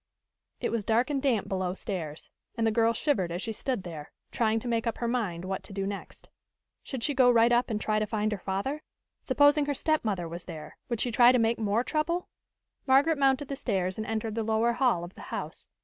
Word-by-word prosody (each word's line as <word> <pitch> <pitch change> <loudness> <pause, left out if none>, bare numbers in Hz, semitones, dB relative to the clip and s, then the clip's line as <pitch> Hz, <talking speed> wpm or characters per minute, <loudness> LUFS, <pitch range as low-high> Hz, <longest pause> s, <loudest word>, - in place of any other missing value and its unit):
It - - -1
was 230 -3 -1
dark 235 +6 +2
and 275 -2 0
damp 250 -7 +1
below 185 -1 -2
stairs, 165 -7 -5 0.3
and 225 - +1
the 225 - +3
girl 230 +1 +3
shivered 230 - 0
as 175 - -3
she 225 - -3
stood 250 -3 -2
there, 160 -5 -8 0.2
trying 225 -1 +1
to 245 - -6
make 230 0 0
up 230 - -1
her 235 - -2
mind 205 -8 -2
what 190 0 -3
to - - -11
do 195 0 -2
next. 200 0 -7 0.5
Should 260 -4 -6
she 290 - +1
go 255 -2 +5
right 235 0 +5
up 240 +1 +3
and 215 -2 -1
try 215 0 0
to 215 - -1
find 215 0 -1
her 210 - -2
father? 200 +12 -3 0.4
Supposing 290 +2 +4
her 285 - 0
stepmother 220 - 0
was 170 +1 -7
there, 155 -1 -9
would 235 -2 -1
she 245 - 0
try 240 +2 +7
to 255 - +3
make 230 0 +1
more 215 +2 +1
trouble? 335 +5 -1 0.6
Margaret 280 +4 +4
mounted 270 0 +2
the 275 - -3
stairs 190 -7 -1
and 215 - -3
entered 220 0 -2
the 225 - -1
lower 225 +2 +2
hall 240 -8 +2
of 175 +2 -8
the - - -12
house. - - -5
225 Hz, 225 wpm, -28 LUFS, 195-255 Hz, 0.6 s, try